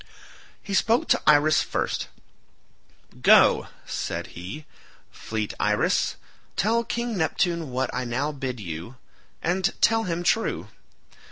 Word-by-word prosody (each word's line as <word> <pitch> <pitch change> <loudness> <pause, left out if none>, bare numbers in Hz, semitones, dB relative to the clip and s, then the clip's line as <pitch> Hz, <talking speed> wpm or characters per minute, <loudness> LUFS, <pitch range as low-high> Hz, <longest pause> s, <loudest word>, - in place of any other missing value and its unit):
He 200 - -5
spoke 230 +5 +2
to - - +3
Iris 150 +1 +5
first. - - -2 1.1
"Go," - - +6 0.2
said - - -3
he, 95 - -8 0.5
"fleet 110 -2 -4
Iris, - - +1 0.4
tell 230 +5 +2
King 235 0 -3
Neptune 170 -2 0
what 130 0 -2
I 125 - -2
now 130 +5 -1
bid 130 -4 -5
you—and 130 - -4
tell 225 0 +3
him 175 -1 -2
true. 225 +5 0
155 Hz, 110 wpm, -25 LUFS, 125-195 Hz, 1.1 s, Go